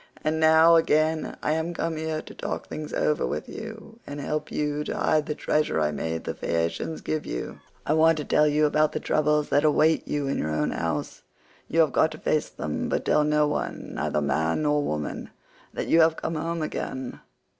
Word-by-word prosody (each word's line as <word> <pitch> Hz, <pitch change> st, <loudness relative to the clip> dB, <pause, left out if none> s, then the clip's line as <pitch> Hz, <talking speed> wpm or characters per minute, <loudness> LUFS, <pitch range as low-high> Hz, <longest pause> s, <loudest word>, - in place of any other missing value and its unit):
And 155 Hz, +1 st, 0 dB
now, 160 Hz, +1 st, +6 dB
again, 155 Hz, 0 st, +1 dB
I -, -, +1 dB
am 160 Hz, +2 st, -1 dB
come 165 Hz, 0 st, -2 dB
here 155 Hz, 0 st, -3 dB
to -, -, -11 dB
talk -, -, -4 dB
things 150 Hz, 0 st, -6 dB
over 150 Hz, -, +1 dB
with -, -, -3 dB
you, 225 Hz, +1 st, -9 dB
and 145 Hz, 0 st, -6 dB
help 150 Hz, +1 st, -3 dB
you 150 Hz, 0 st, -1 dB
to -, -, -3 dB
hide 155 Hz, -1 st, +1 dB
the 150 Hz, -, -2 dB
treasure 150 Hz, -, 0 dB
I 75 Hz, -1 st, +1 dB
made 80 Hz, +3 st, -3 dB
the -, -, -3 dB
Phaeacians 85 Hz, -, -2 dB
give 155 Hz, -1 st, -2 dB
you; -, -, -5 dB, 0.3 s
I 150 Hz, -, +2 dB
want 160 Hz, 0 st, +4 dB
to 150 Hz, -, -4 dB
tell 150 Hz, 0 st, +3 dB
you 150 Hz, +1 st, +3 dB
about 155 Hz, +1 st, +2 dB
the -, -, -1 dB
troubles 150 Hz, 0 st, +1 dB
that 145 Hz, -, +3 dB
await 155 Hz, +1 st, +3 dB
you 145 Hz, -1 st, -1 dB
in 135 Hz, -, -1 dB
your 75 Hz, -, -1 dB
own 75 Hz, -1 st, 0 dB
house; 80 Hz, -3 st, -3 dB, 0.5 s
you 165 Hz, -, +3 dB
have 155 Hz, -5 st, +2 dB
got 160 Hz, -, +4 dB
to -, -, -9 dB
face 155 Hz, 0 st, 0 dB
them, 75 Hz, -1 st, -4 dB
but -, -, -1 dB
tell 150 Hz, -, +3 dB
no 150 Hz, 0 st, +3 dB
one, 150 Hz, -, -4 dB
neither -, -, -1 dB
man 80 Hz, -, 0 dB
nor 150 Hz, 0 st, +2 dB
woman, 75 Hz, -, -3 dB, 0.4 s
that -, -, -4 dB
you 165 Hz, -, +5 dB
have 160 Hz, 0 st, +4 dB
come -, -, -3 dB
home 165 Hz, +1 st, -2 dB
again. 130 Hz, -4 st, -5 dB
150 Hz, 210 wpm, -26 LUFS, 145-160 Hz, 0.5 s, now